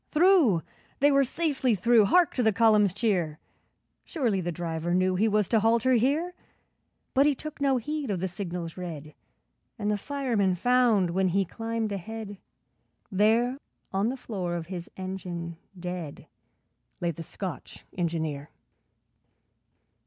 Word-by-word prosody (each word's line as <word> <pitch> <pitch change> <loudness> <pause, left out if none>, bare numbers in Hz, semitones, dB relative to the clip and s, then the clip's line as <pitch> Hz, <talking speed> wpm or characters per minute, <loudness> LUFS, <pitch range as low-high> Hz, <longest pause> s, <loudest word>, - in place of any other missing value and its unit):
Through! 310 - +4 0.4
They 290 +1 +5
were 275 0 +5
safely 270 -4 0
through! 220 +3 +4
Hark 350 - +4
to 255 - 0
the 220 -2 +4
column's 210 -2 +4
cheer! 185 -7 0 0.7
Surely 235 - -1
the 175 0 -2
driver 170 0 -2
knew 185 0 +2
He 200 +5 +2
was 210 -2 +2
to 225 - +4
halt 225 +1 +3
her 260 - +3
here; 285 +9 +1 0.8
But 275 +2 +5
he 290 - +2
took 305 +1 -8
no 275 -2 +3
heed 295 +2 -3
of 195 -3 -1
the 190 - -1
signals 175 -2 -5
red, 155 -4 -7 0.6
And 210 -1 -1
the 205 - -1
fireman 235 -9 0
found, 230 -3 +3
when 190 +2 +1
he 195 +2 +1
climbed 225 +3 -3
ahead, 205 +1 -6 0.7
There 225 +6 +2 0.3
on 195 +4 +1
the 265 - -4
floor 185 -8 -4
of 170 -1 -4
his 175 -1 -6
engine 180 -3 -5 0.2
dead, 175 -4 -6 0.7
Lay 175 -1 0
the 165 - -8
Scotch 185 +3 -7
Engineer! 160 -4 -2
205 Hz, 145 wpm, -27 LUFS, 175-245 Hz, 0.8 s, They